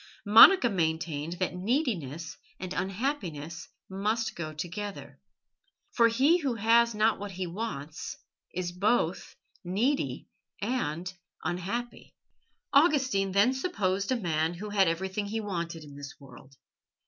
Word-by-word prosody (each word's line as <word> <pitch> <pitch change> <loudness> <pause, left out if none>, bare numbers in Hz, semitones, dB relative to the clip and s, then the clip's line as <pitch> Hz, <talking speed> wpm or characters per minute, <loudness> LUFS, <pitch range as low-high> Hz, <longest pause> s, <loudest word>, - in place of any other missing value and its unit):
Monica 235 - +9
maintained 160 -4 -1
that 180 +1 -2
neediness 180 - -2 0.2
and 185 0 -5
unhappiness 180 - -3 0.2
must 210 +4 -1
go 155 -2 -5
together. 190 +6 -6 0.7
"For 230 -1 +5
he 265 +9 +4
who 270 -7 -1
has 230 +1 +3
not 215 +1 +2
what 205 -1 -6
he 185 0 -3
wants," 170 -5 -5 0.3
she - - -13
said, 175 0 -4
"is 180 - -16
both 200 -4 0 0.3
needy 225 +11 -1 0.3
and 185 -6 -2 0.3
unhappy." 195 +9 -4 0.6
Augustine 270 - +3
then 205 +6 +4
supposed 200 - -1
a - - +3
man 165 -6 -1
who 210 +4 -6
had 195 -3 +4
everything 190 +5 -2
he 220 +2 -2
wanted 170 -6 -4
in 145 -2 -12
this 140 -1 -9
world. 135 0 -15
195 Hz, 130 wpm, -29 LUFS, 170-230 Hz, 0.7 s, Monica